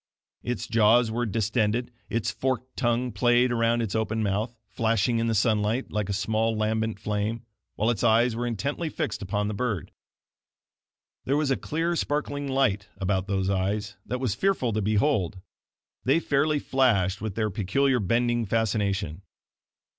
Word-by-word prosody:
Its 120 -2 -3
jaws 115 +1 +4
were 120 +1 -1
distended, 110 +2 0 0.2
its 115 0 -1
forked 130 +1 -2
tongue 120 0 0
played 120 +1 +3
around 115 0 +2
its 105 - -3
open 110 0 0
mouth, 105 +4 -1
flashing 115 +2 +1
in 115 - 0
the 115 - +1
sunlight 110 +3 +1
like 105 -2 -2
a - - 0
small 110 +3 0
lambent 110 0 -1
flame, 105 +2 -2 0.3
while 110 +3 +2
its 110 - -3
eyes 115 +1 +4
were 120 +1 -2
intently 140 - -2
fixed 155 -1 -3
upon 105 +2 -1
the 105 - -2
bird. 105 - -2 1.3
There 140 +2 +1
was 150 -2 +1
a - - +4
clear, 165 +5 -1
sparkling 145 -2 -2
light 130 -8 +1
about 95 0 -1
those 95 -2 0
eyes 100 +2 -1
that 125 - -2
was 125 -6 0
fearful 130 - 0
to 110 - 0
behold 105 - +1 0.6
they 135 +8 +3
fairly 150 0 +1
flashed 110 -9 +1
with 110 -3 -4
their 110 -2 0
peculiar 125 +7 +1
bending 120 +2 +1
fascination. 100 -5 0
115 Hz, 155 wpm, -26 LUFS, 105-125 Hz, 1.3 s, jaws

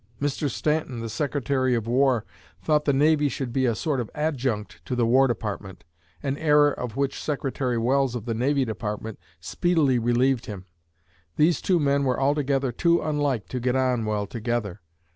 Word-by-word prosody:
Mr. 145 +1 -1
Stanton, 150 -2 -1
the 115 - -4
Secretary 135 -1 0
of 115 -2 -2
War, 125 -1 +2 0.3
thought 150 -1 +1
the 145 - +3
Navy 150 +1 +3
should 130 -3 -4
be 130 -1 +2
a 115 - +1
sort 145 +3 -1
of 120 - -3
adjunct 130 -8 -2
to 125 - -2
the 120 -1 +2
War 130 +4 +4
Department 105 -5 -5 0.4
an 140 +1 -1
error 150 -2 +4
of 125 -3 -6
which 140 -1 -1
Secretary 135 -4 -2
Welles 130 +2 +1
of 115 -3 -5
the 115 - -1
Navy 135 +4 +1
Department 110 -1 -5 0.2
speedily 145 - +1
relieved 120 +2 +1
him. 100 -3 -7 0.7
These 160 +3 +3
two 180 -3 +2
men 140 -1 +2
were 130 -2 0
altogether 135 -1 +1
too 170 +8 +2
unlike 145 -7 -1
to 125 - -3
get 125 +1 0
on 130 -3 +1
well 105 -1 -1
together. 110 -3 -3
130 Hz, 175 wpm, -25 LUFS, 115-145 Hz, 0.7 s, War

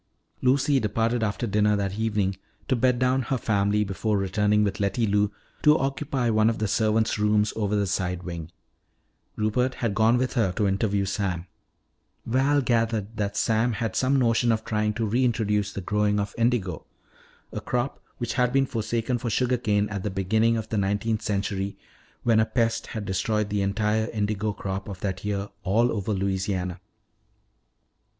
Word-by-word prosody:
Lucy 135 +2 +3
departed 115 +2 0
after 105 +1 -1
dinner 105 0 +2
that 100 -1 -1
evening 105 -3 0 0.3
to 130 - +2
bed 125 +1 +2
down 130 +1 +2
her 130 +2 -1
family 105 -2 +1
before 105 +2 -1
returning 105 +2 +2
with 100 -1 -1
Letty 100 +3 +1
Lou 105 0 +2 0.3
to 150 +1 +6
occupy 135 -1 -1
one 110 0 +4
of 115 - -1
the 110 - -1
servant's 110 +1 +1
rooms 105 0 +2
over 105 -1 0
the 100 -1 +1
side 90 -1 -2
wing. 85 -2 -6 0.9
Rupert 125 +4 0
had 115 -4 -1
gone 110 +4 +4
with 130 0 -1
her 100 -6 +1
to 105 +1 +1
interview 100 0 +1
Sam. 95 -3 -2 0.8
Val 135 +4 +2
gathered 115 -3 0
that 100 -1 -2
Sam 115 +3 +2
had 110 0 -3
some 135 +2 +2
notion 120 -1 +3
of 110 0 -1
trying 105 -1 0
to 115 - -1
reintroduce 110 -3 +1
the 100 - -5
growing 105 +2 +1
of 100 0 -3
indigo, 115 -8 0 0.7
a - - -5
crop 125 +2 -2 0.2
which 120 -2 -3
had 125 -1 +2
been 135 +1 +3
forsaken 115 +1 -2
for 120 0 -3
sugar 125 +3 +1
cane 105 -3 +1
at 100 -2 -4
the 105 - -2
beginning 110 +5 +1
of 110 - -5
the 110 - 0
nineteenth 105 +3 0
century 100 -1 -2 0.5
when 115 -2 +4
a 110 - +4
pest 115 -2 0
had 110 -2 -5
destroyed 105 +2 0
the 105 -1 0
entire 105 +2 0
indigo 105 -1 -1
crop 95 0 -5
of 95 -2 -7
that 95 -2 -3
year 100 -1 -2
all 115 +6 +2
over 105 -1 -2
Louisiana. 95 -2 -1
105 Hz, 170 wpm, -25 LUFS, 100-115 Hz, 0.9 s, to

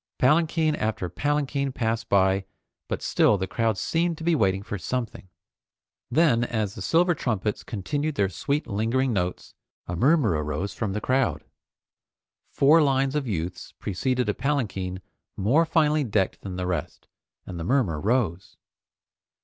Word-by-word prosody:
Palanquin 155 +2 +3
after 110 -4 -2
palanquin 140 - -1
passed 115 -2 -2
by, 95 0 +3 0.4
but - - -4
still 105 - +3
the 95 - -2
crowd 110 +1 0
seemed 165 - 0
to 160 - -8
be 170 +1 +2
waiting 95 -8 +1
for 100 -1 -5
something. 115 -4 -4 0.8
Then, 150 -8 +3
as 110 -4 -2
the - - -9
silver 175 +2 +3
trumpets 110 - -2
continued 145 +8 -3
their 100 - +2
sweet 140 - -2
lingering 115 +5 0
notes, 90 -3 -3 0.3
a 90 - -4
murmur 135 - +3
arose 75 +5 -2
from 105 -3 -3
the 105 - -3
crowd. 120 - 0 1.1
Four 155 +4 +5
lines 135 -2 +2
of 150 -3 -1
youths 90 -3 -4
preceded 125 +5 -1
a 105 - +1
palanquin 100 -10 -2 0.3
more 140 - +3
finely 155 -2 +2
decked 105 -6 0
than 95 -2 -6
the 90 0 -3
rest, 90 -4 -4 0.4
and 90 -2 -7
the - - -4
murmur 100 - +1
rose. 100 -6 -1
115 Hz, 150 wpm, -25 LUFS, 95-145 Hz, 1.1 s, Four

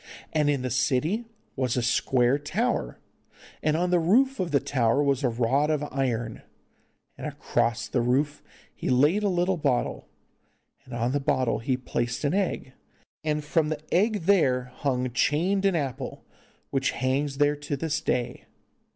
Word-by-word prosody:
And 150 -2 +2
in 140 -3 0
the 130 - -2
city 150 - +1 0.3
was 130 -2 0
a 125 - +1
square 125 +2 +2
tower, 195 +13 -1 0.6
and 155 0 +1
on 180 +1 0
the 180 - +4
roof 250 +11 +3
of 180 -2 -1
the 140 - +3
tower 135 -1 +1
was 140 -1 +1
a 125 - +3
rod 125 +6 +1
of 150 -2 0
iron, 120 -4 -2 0.8
and - - -4
across 115 -2 -1
the 125 - 0
rod 125 +5 +3 0.5
he - - -4
laid 150 +11 +3
a 205 - +2 0.3
bottle, 140 -6 -1 0.8
and 130 -2 -8
on 120 +1 0
the 145 - +1
bottle 130 -3 +1
he 125 +2 0
placed 120 -1 -3
an 145 +2 +1
egg, 185 -9 -1 0.5
and 150 -1 -1
from 150 +1 +1
the 155 -1 -2
egg 210 +3 +2
there 130 -9 +2
hung 130 -3 -1
chained 175 +10 +1
an 195 -2 +3
apple, 135 -4 -4 0.5
which 135 -1 0
hangs 135 +2 0
there 145 0 +3
to 145 0 -4
this 155 +1 -1
day. 125 -1 -2
140 Hz, 160 wpm, -26 LUFS, 125-155 Hz, 0.8 s, the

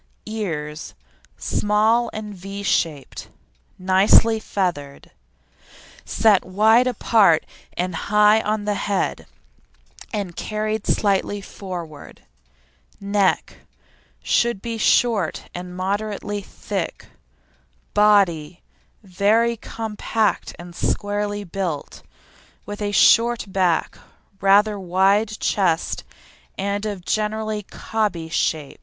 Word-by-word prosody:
EARS 160 -9 -5 0.4
Small 220 +3 +1
and 210 -1 -6
V 195 +2 -7
shaped, 155 -7 -1 0.5
nicely 195 +4 +4
feathered, 170 -10 -3 0.9
set 210 -4 +3
wide 220 +6 +4
apart 215 -9 +3 0.3
and 180 0 -1
high 210 +5 +3
on 210 -1 -2
the 210 - 0
head 200 0 -2 0.8
and 200 -6 -4
carried 215 0 -3
slightly 205 0 +1
forward. 175 -6 -9 0.8
NECK 200 -1 0 0.7
Should 235 -4 +1
be 230 +2 -5
short 220 -7 +2
and 180 0 -7
moderately 205 +2 -3
thick. - - -5 0.9
BODY 190 -6 +3 0.4
Very 210 +5 +2
compact 220 -1 -2
and 175 0 -10
squarely 205 +1 -2
built, 180 -5 -4 0.6
with 205 +1 -7
a 205 0 -1
short 235 +3 +4
back, 185 -3 0 0.4
rather 205 +2 +4
wide 195 +4 +2
chest, 175 -5 0 0.5
and 200 +2 -2
of 195 -4 -6
generally 215 0 -1
"cobby" 205 -5 -3
shape. 155 -3 -2
205 Hz, 90 wpm, -22 LUFS, 185-215 Hz, 0.9 s, nicely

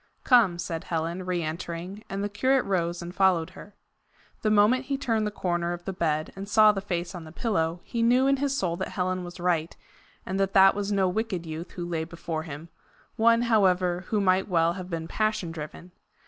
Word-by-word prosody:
"Come," 225 -9 +5
said 165 -1 -4
Helen, 170 +2 -3
re 175 -2 -1
entering, 170 +5 -5
and 195 +1 -3
the - - 0
curate 260 +6 +1
rose 175 -2 -1
and 175 +1 -7
followed 185 -4 +2
her. 205 - -13 0.7
The 215 - +1
moment 215 +5 +4
he 275 0 -1
turned 225 -5 0
the - - 0
corner 175 -3 -2
of 175 0 -8
the 195 - -3
bed 155 -3 -1
and 195 +1 -7
saw 215 0 +6
the 195 -2 -4
face 175 -3 -3
on 175 -3 -7
the 155 - -11
pillow, 170 -4 -1
he 235 - -3
knew 245 +3 +4
in 275 0 +3
his 275 0 -1
soul 175 -6 0
that - - -3
Helen 185 0 -2
was 175 +1 -9
right, 170 -2 0 0.5
and 190 +1 -3
that 195 0 0
that 195 0 +7
was 205 0 -3
no 195 -2 +2
wicked 185 -2 -2
youth 160 +2 -7
who 175 - -5
lay 165 -2 -2
before 165 -1 -5
him 160 +1 -8 0.5
one, 230 +1 +4
however, 185 -5 +2
who 215 - 0
might 190 0 +2
well 170 -3 +2
have 185 0 -7
been 165 -2 -4
passion 215 -5 -1
driven. 165 +3 -8
185 Hz, 210 wpm, -27 LUFS, 170-210 Hz, 0.7 s, that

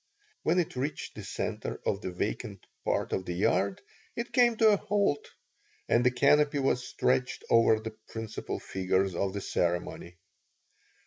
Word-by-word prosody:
When 165 +3 +2
it 175 -6 0
reached 135 +4 -3
the - - -8
center - - -4
of 100 - 0
the - - -3
vacant 100 +2 -4 0.2
part - - 0
of 95 - 0
the 90 - -3
yard 100 +1 +1 0.3
it 235 0 -4
came 240 -3 +4
to 220 -1 +6
a 205 - +4
halt 200 -7 0 0.6
and 120 - +3
a - - +7
canopy 145 +4 +3
was 135 -2 +1
stretched 125 0 0
over 115 -1 +5
the 110 0 -7
principal 110 -1 -5
figures 95 0 0
of 95 +2 -1
the 100 - -3
ceremony. 85 0 -2
115 Hz, 155 wpm, -29 LUFS, 95-150 Hz, 0.6 s, a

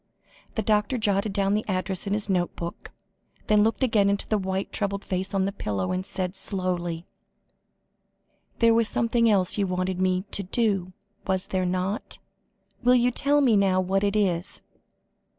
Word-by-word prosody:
The 220 - -1
doctor 210 +4 +1
jotted 205 -1 0
down 195 0 +1
the 210 +1 +1
address 190 0 -2
in 200 - 0
his 210 -1 -1
notebook, 175 -2 -3 0.6
then 210 -1 +4
looked 225 +3 +1
again 215 -5 +3
into 200 0 -1
the 215 - +1
white, 190 0 -3
troubled 200 -1 -2
face 190 +1 -2
on 195 -1 +1
the 200 - -1
pillow, 100 - -3
and 185 0 -1
said 185 -1 -3
slowly: 180 -3 -2 1.5
"There 230 -1 +5
was 230 -1 +3
something 230 +2 +2
else 195 -1 +2
you 200 - +1
wanted 185 0 -2
me 185 0 +1
to - - 0
do, 195 -2 -1 0.3
was 190 -1 0
there 185 -1 0
not? 185 +3 -2 0.6
Will 250 0 +5
you 245 0 +3
tell 285 +4 +2
me 245 -6 +4
now 195 -2 +3
what 190 +2 0
it 200 0 +1
is?" 185 -4 0
195 Hz, 170 wpm, -25 LUFS, 185-215 Hz, 1.5 s, There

